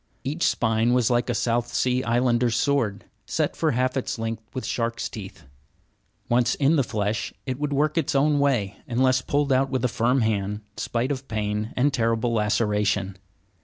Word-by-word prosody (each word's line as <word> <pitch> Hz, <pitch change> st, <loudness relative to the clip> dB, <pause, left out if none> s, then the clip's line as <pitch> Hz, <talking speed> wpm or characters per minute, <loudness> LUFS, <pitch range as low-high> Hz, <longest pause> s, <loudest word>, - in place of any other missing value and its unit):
Each 150 Hz, +6 st, 0 dB
spine 115 Hz, +1 st, +2 dB
was 125 Hz, -1 st, +2 dB
like 120 Hz, +1 st, +1 dB
a 120 Hz, -, 0 dB
South 120 Hz, +1 st, 0 dB
Sea 125 Hz, 0 st, +1 dB
Islander's 120 Hz, -1 st, +2 dB
sword, 125 Hz, -9 st, 0 dB, 0.2 s
set -, -, -1 dB
for 160 Hz, -, +1 dB
half 130 Hz, +2 st, 0 dB
its 130 Hz, -, -2 dB
length 115 Hz, 0 st, -3 dB
with 130 Hz, -, -5 dB
shark's 115 Hz, -1 st, -2 dB
teeth. 100 Hz, -2 st, -9 dB, 0.8 s
Once 120 Hz, 0 st, +2 dB
in 145 Hz, +3 st, +3 dB
the 140 Hz, -, +3 dB
flesh 105 Hz, -2 st, -2 dB
it 130 Hz, 0 st, -3 dB
would 150 Hz, 0 st, -2 dB
work 150 Hz, +3 st, +1 dB
its 140 Hz, -, -1 dB
own 145 Hz, +1 st, +3 dB
way, 115 Hz, -9 st, +1 dB
unless 130 Hz, +1 st, +2 dB
pulled 145 Hz, 0 st, +1 dB
out 135 Hz, +1 st, +2 dB
with 130 Hz, -1 st, -1 dB
a -, -, +4 dB
firm 125 Hz, +2 st, +1 dB
hand 105 Hz, -1 st, -1 dB
spite 120 Hz, +4 st, -2 dB
of 135 Hz, -1 st, -4 dB
pain 105 Hz, 0 st, -2 dB
and 140 Hz, +2 st, +2 dB
terrible 115 Hz, -1 st, +1 dB
laceration. 105 Hz, -2 st, +1 dB
120 Hz, 175 wpm, -24 LUFS, 110-130 Hz, 0.8 s, a